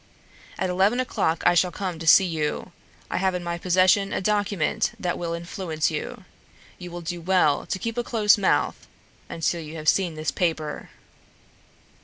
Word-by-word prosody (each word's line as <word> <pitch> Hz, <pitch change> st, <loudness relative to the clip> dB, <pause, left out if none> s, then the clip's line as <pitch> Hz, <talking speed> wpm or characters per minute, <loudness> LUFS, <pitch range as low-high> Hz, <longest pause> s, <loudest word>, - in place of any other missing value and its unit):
At 185 Hz, -1 st, -1 dB
eleven 195 Hz, +7 st, +2 dB
o'clock 210 Hz, -10 st, -1 dB
I 175 Hz, -, +6 dB
shall 180 Hz, +1 st, +3 dB
come 180 Hz, -2 st, -5 dB
to 165 Hz, -, -6 dB
see 190 Hz, +4 st, +8 dB
you. 155 Hz, -4 st, -3 dB, 0.4 s
I -, -, -1 dB
have 190 Hz, 0 st, +1 dB
in 180 Hz, -, -4 dB
my 170 Hz, 0 st, -3 dB
possession 185 Hz, +2 st, +3 dB
a -, -, -1 dB
document 205 Hz, -3 st, 0 dB
that 175 Hz, -1 st, -1 dB
will 170 Hz, -1 st, -4 dB
influence 170 Hz, -2 st, -2 dB
you. -, -, -5 dB, 0.6 s
You 180 Hz, -, -8 dB
will 175 Hz, 0 st, -7 dB
do 170 Hz, +1 st, -5 dB
well 175 Hz, -4 st, +2 dB
to -, -, -2 dB
keep 230 Hz, +4 st, -3 dB
a -, -, -1 dB
close 215 Hz, -4 st, +3 dB
mouth 200 Hz, -3 st, 0 dB, 0.4 s
until 165 Hz, +1 st, -1 dB
you 155 Hz, 0 st, -9 dB
have 155 Hz, -1 st, -7 dB
seen 180 Hz, -3 st, +2 dB
this 155 Hz, 0 st, -2 dB
paper." 160 Hz, -4 st, -2 dB
175 Hz, 175 wpm, -24 LUFS, 165-190 Hz, 0.6 s, see